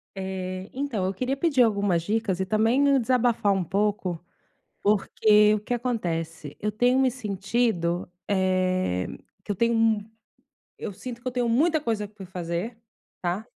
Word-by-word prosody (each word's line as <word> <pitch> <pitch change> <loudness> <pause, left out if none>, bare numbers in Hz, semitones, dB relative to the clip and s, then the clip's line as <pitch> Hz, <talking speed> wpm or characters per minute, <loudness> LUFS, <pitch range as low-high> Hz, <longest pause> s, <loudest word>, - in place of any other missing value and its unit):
Eh, 190 0 -4
então, 255 -8 -2
eu 190 - -1
queria 255 +7 -2
pedir 275 -4 +2
algumas 200 -6 +2
dicas 205 0 -1
e 190 - 0
também 225 +6 +2
me 280 -1 +5
desabafar 235 -4 +2
um 190 -2 0
pouco, 195 -2 -1 0.6
porque 210 +1 +4
o - - -2
que 210 +4 -4
acontece? 165 - -3
Eu 210 - -1
tenho 245 +5 +3
me 260 -1 +3
sentido, 200 -5 -1 0.2
eh, 185 - +1 0.4
que - - -4
eu - - -1
tenho 235 +4 +2
um 220 -1 +2 0.7
eu - - -4
sinto 240 +4 -8
que 255 - -6
eu - - -1
tenho 245 -1 0
muita 310 +8 +3
coisa 220 -7 -2
pra 200 -1 -11
fazer, 180 +5 -4 0.4
tá? 180 +5 -2
210 Hz, 160 wpm, -26 LUFS, 185-240 Hz, 0.7 s, me